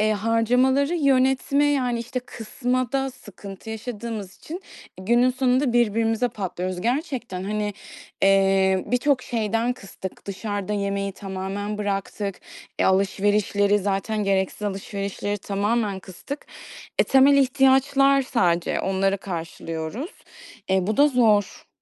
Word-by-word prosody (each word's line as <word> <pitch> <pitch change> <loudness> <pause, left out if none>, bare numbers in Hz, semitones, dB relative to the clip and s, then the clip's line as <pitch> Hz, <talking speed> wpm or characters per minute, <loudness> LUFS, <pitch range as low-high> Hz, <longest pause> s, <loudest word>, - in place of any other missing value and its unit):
eee, 215 0 +3
harcamaları 250 - +2
yönetme, 275 -1 +2
yani, 255 -5 +1
işte, 240 +2 -4
kısmada 255 +3 -2
sıkıntı 205 -3 -11
yaşadığımız 220 -3 -6
için 350 +5 -8 0.4
günün 240 +6 +3
sonunda 255 0 +1
birbirimize 225 0 +2
patlıyoruz. 185 -4 -4
Gerçekten, 240 - -2
hani, 210 0 -2 0.5
eee, 195 -1 +4
birçok 250 +1 +1
şeyden 230 +1 0
kıstık. 195 -5 -9
Dışarıda 205 0 -4
yemeği 200 -1 -1
tamamen 195 +2 -5
bıraktık. 200 -1 -3 0.4
E, - - +2
alışverişleri 200 +1 +2
zaten 205 +2 -1
gereksiz 195 +1 0
alışverişleri 200 0 -3
tamamen 205 0 -1
kıstık. 195 +10 -8 0.5
E, - - +5
temel 270 +1 +5
ihtiyaçlar 270 +1 +4
sadece, 175 -9 +1
onları 195 +1 0
karşılıyoruz. 165 - -5 0.6
E, 190 -1 +2
bu 215 - -1
da 290 +1 +6
zor. 220 -7 +2
215 Hz, 110 wpm, -24 LUFS, 195-255 Hz, 0.6 s, da